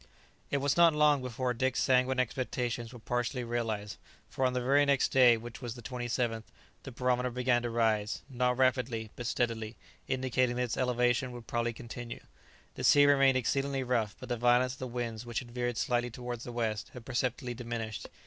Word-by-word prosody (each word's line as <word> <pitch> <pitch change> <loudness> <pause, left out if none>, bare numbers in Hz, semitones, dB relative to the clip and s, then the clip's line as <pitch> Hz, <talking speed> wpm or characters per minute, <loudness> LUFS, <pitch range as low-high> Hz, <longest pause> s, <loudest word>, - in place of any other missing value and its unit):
It 145 - +1
was 140 +2 0
not 170 -2 +6
long 150 -2 +4
before 125 0 -2
Dick's 130 +2 0
sanguine 130 0 +3
expectations 125 -2 -2
were 125 - -10
partially 120 +2 -2
realized, 110 -4 -3 0.3
for 135 - -2
on 125 - -2
the 125 - 0
very 135 +4 +4
next 140 -2 +2
day, 125 -3 +6
which 115 +2 -9
was 120 -2 -5
the 120 - -11
27th, 120 -2 -2 0.4
the 135 - -9
barometer 125 0 0
began 125 0 +1
to 120 - -2
rise, 110 -2 0
not 125 -2 0
rapidly, 125 -4 +1
but 120 - -5
steadily, 115 -2 -1 0.3
indicating 130 -1 0
that 125 - 0
its 120 - -2
elevation 125 0 +1
would 120 -1 -9
probably 120 +1 -1
continue. 115 +1 -8 0.5
The - - -7
sea 145 0 +7
remained 135 -2 +5
exceedingly 135 +2 0
rough, 115 -4 0
but 130 - -9
the 120 - -1
violence 125 +2 +3
of 135 - -12
the 130 - -4
wind, 120 -2 -4
which 120 -2 -6
had 120 -1 -4
veered 120 -1 -2
slightly 120 0 0
towards 120 -1 -6
the 120 - -6
west, 110 -3 -2
had 120 -2 -9
perceptibly 125 0 -2
diminished. 115 -2 -5
125 Hz, 190 wpm, -31 LUFS, 120-130 Hz, 0.5 s, sea